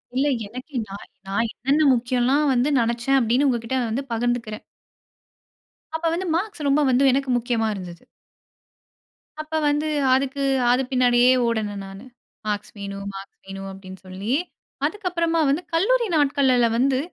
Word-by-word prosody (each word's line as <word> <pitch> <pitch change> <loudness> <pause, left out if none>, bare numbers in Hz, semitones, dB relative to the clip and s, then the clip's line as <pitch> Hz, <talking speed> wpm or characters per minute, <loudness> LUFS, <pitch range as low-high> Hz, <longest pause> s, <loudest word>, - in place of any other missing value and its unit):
இல்ல. 275 +3 +2 0.2
எனக்கு 255 +5 -10
நான் 200 - -9 0.2
நான் 220 +4 0
என்னென்ன 280 +6 +1
முக்கியம்லாம் 255 +4 +1
வந்து 250 +4 +2
நினைச்சேன் 235 +3 +1
அப்பிடின்னு 250 +3 +2
உங்ககிட்ட 240 +1 -1
வந்து 260 +5 -2
பகிர்ந்துக்கிறேன். 230 -2 -2 1.3
அப்ப 325 +1 -3
வந்து 370 +2 -2
மார்க்ஸ் 370 -5 -3
ரொம்ப 295 +2 +3
வந்து 255 +3 +3
எனக்கு 270 0 0
முக்கியமா 230 -2 0
இருந்தது. 175 -3 -9 1.4
அப்ப 310 +1 -12 0.2
வந்து 295 +2 0 0.3
அதுக்கு 275 +1 0 0.3
அது 250 +2 +3
பின்னாடியே 250 0 +4 0.2
ஓடினேன் 210 -3 -2
நானு. 195 +5 -11 0.4
மார்க்ஸ் 205 -1 -3
வேணும், 200 0 -6
மார்க்ஸ் 195 0 -10
வேணும் 195 0 -7
அப்பிடின்னு 190 -1 -11
சொல்லி, 195 +6 -3 0.5
அதுக்கப்பறமா 340 -5 -1
வந்து 295 +6 +1
கல்லூரி 470 +8 +2
நாட்கள்ல 265 -4 +3
வந்து 260 +1 +2
250 Hz, 135 wpm, -23 LUFS, 220-280 Hz, 1.4 s, பின்னாடியே